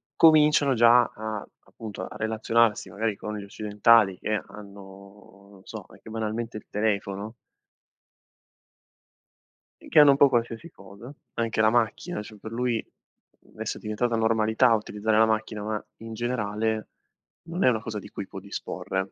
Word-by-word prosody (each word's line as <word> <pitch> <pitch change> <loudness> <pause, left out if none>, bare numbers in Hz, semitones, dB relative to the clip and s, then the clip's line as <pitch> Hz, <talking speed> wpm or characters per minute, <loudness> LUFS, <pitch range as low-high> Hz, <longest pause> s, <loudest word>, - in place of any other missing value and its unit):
cominciano 150 -3 +5
già 120 +1 +6
a, 110 -2 -6 0.2
appunto, 105 -4 -8
a - - -11
relazionarsi 110 -1 +1
magari 110 +2 -2
con 105 +1 -6
gli 100 - -7
occidentali 105 -1 +3
che 105 0 -1
hanno, 100 -1 -14
non 95 -2 -17
so, 110 -3 -8
anche 110 - -15
banalmente 110 0 -4
il - - -12
telefono. 105 0 -2 2.5
Che - - +5
hanno 145 -1 +8
un 135 - +2
po' 140 - +7
qualsiasi 120 +5 -2
cosa, 115 +8 -13 0.2
anche 115 -2 0
la 110 - +5
macchina, 120 +6 -1
cioè 105 0 -12
per 110 - -9
lui 120 -1 -1 0.7
adesso - - -5
è - - -11
diventata 115 +2 -1
normalità 110 +2 +3
utilizzare 110 0 0
la 110 - +5
macchina, 110 -1 -2
ma 105 0 -4
in 115 0 -9
generale 110 -2 -2 0.6
non 170 +3 -3
è - - +6
una 110 -3 +1
cosa 110 -2 -5
di - - -12
cui 100 - -6
può - - -9
disporre. 95 0 -5
110 Hz, 150 wpm, -26 LUFS, 105-115 Hz, 2.5 s, hanno